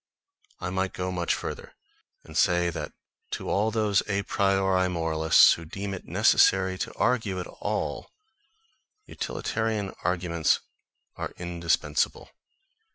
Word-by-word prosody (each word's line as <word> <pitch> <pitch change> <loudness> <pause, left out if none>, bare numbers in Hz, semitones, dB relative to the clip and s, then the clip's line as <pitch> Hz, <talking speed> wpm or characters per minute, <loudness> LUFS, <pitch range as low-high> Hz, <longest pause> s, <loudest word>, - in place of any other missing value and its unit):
I 90 0 -4
might 95 0 -1
go 90 0 -3
much 85 -2 -1
further, - - -7 0.5
and 80 - -13
say 85 -1 +3
that - - -5 0.4
to - - -3
all 105 +3 +2
those 105 -3 +2
a 100 -1 0
priori 95 -2 +2
moralists 80 -2 +5
who 85 - -6
deem 100 +5 -5
it 95 - -7
necessary 95 -1 +4
to - - -3
argue 110 -7 0
at 90 - -4
all, - - -4 1.0
utilitarian 110 -3 -3
arguments 85 -1 +1 0.6
are - - -5
indispensable. 85 -4 -1
95 Hz, 120 wpm, -27 LUFS, 85-100 Hz, 1.0 s, moralists